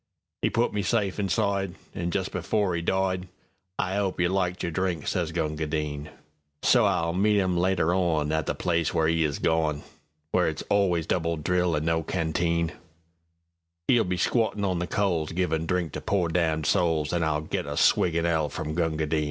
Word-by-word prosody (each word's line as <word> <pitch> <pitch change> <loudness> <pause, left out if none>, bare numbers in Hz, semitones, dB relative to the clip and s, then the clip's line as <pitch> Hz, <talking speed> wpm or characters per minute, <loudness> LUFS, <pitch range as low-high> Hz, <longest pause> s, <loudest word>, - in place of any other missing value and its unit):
'E - - +2
put 120 +1 +1
me 105 - 0
safe 100 0 0
inside, 100 -1 0 0.2
An' 85 0 -3
just 95 +1 -2
before 90 +1 0
'e 85 - -1
died:"I 95 +1 -3
'ope 100 -3 -1
you 90 -1 +3
liked 90 -1 -1
your 85 - -1
drink," 90 -3 -1
sez 85 -3 -1
Gunga 80 -2 -2
Din.So 75 -1 -1
I'll 85 0 +1
meet 105 +3 +3
'im 95 -2 +1
later 90 -1 +2
onIn 80 -5 +1 0.2
the - - -1
place 85 -2 0
where 80 - +3
'e 80 0 +2
is 75 -2 -1
gone—Where 80 +1 -1
it's 80 -1 -3
always 90 -5 +2
double 85 -1 0
drill 90 +2 +1
and 75 +1 -1
no 80 0 +1
canteen;'E'll 85 0 -1 1.3
be 90 0 -2
squattin' 105 +1 +1
on 90 -3 0
the 85 - -2
coalsGivin' 85 -3 0
drink 90 -3 0
to - - -5
pore 95 -4 0
damned 80 -3 0
souls, 80 -3 +1
An' 85 -1 +1
I'll 75 -1 0
get 80 - -3
a 75 - -4
swig 85 -2 +3
in 85 0 +1
Hell 80 -3 +1
from 75 +2 -4
Gunga 80 -2 0
Din! 75 +1 0
85 Hz, 175 wpm, -26 LUFS, 80-95 Hz, 1.3 s, you